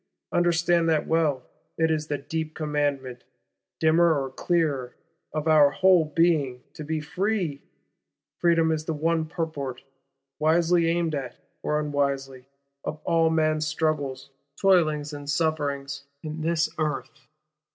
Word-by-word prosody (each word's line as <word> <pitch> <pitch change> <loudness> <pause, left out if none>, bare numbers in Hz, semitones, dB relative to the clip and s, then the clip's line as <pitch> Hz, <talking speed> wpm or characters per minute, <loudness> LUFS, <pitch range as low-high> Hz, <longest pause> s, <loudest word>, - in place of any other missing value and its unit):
Understand 170 -1 +2
that 155 -2 +2
well, 155 -6 +1 0.3
it 160 0 +2
is 155 -1 -1
the 145 - -1
deep 155 +3 -4
commandment, 145 -5 -2 0.6
dimmer 160 -1 +4
or 135 -1 -4
clearer, 145 -6 -1 0.4
of 155 0 -3
our 150 -2 +6
whole 185 +1 +4
being, 150 -5 +1
to 155 - -8
be 155 +1 -2
free. 180 -1 -2 0.8
Freedom 165 -1 +3
is 155 -1 -2
the 160 - -2
one 160 +1 0
purport, 145 -6 -4 0.6
wisely 165 +2 +3
aimed 165 -1 0
at, 130 -4 -4 0.2
or 150 0 0
unwisely, 140 -3 -2 0.4
of 155 - -4
all 165 -1 +3
man's 155 -1 +1
struggles, 150 -4 -2 0.3
toilings 155 -6 +2
and 145 -1 -7
sufferings, 140 -3 -1 0.2
in 155 0 -5
this 165 0 +1
Earth. 150 -3 -3
155 Hz, 130 wpm, -26 LUFS, 145-165 Hz, 0.8 s, our